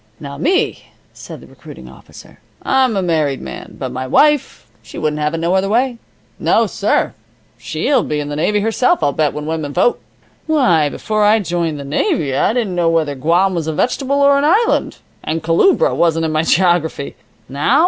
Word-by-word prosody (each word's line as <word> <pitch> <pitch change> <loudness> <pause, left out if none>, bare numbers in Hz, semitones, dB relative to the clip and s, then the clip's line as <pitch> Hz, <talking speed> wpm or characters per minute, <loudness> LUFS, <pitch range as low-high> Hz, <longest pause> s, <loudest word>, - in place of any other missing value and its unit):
"Now 140 -1 -8
me," 365 +6 0 0.3
said - - -11
the - - -14
recruiting - - -13
officer, - - -15 0.2
"I'm 260 -5 +1
a 190 - 0
married 155 -6 0
man. - - -9
But 130 -2 -5
my 130 +1 -5
wife, 295 - +2 0.2
she - - -12
wouldn't 150 0 -2
have 150 +2 -1
it - - -3
no 170 +2 -1
other 190 +1 +1
way. 240 +2 0 0.4
No, - - +2
sir! - - -1 0.5
She'll 270 -5 0
be 150 -6 -3
in 145 - -4
the 145 - -5
navy 205 +7 0
herself, 245 - +1
I'll 145 - +2
bet, 150 -1 +1
when 150 0 -6
women 155 -2 -4
vote. 185 +9 +2 0.5
Why, 180 - +2
before 215 +7 -2
I 210 +2 +5
joined 170 -6 -2
the - - -6
navy 140 0 -1
I - - +2
didn't 225 -5 -2
know 175 -2 +1
whether 160 -3 0
Guam 170 +8 +1
was 165 -3 -3
a 160 - -1
vegetable 270 - -1
or 280 0 +4
an - - -1
island, 410 +10 +1 0.3
and 160 +1 -3
Culebra 380 - +3
wasn't 165 -1 +1
in 160 - -1
my 155 0 +1
geography. 170 -4 0 0.3
Now? 145 - +1
170 Hz, 190 wpm, -17 LUFS, 150-235 Hz, 0.5 s, I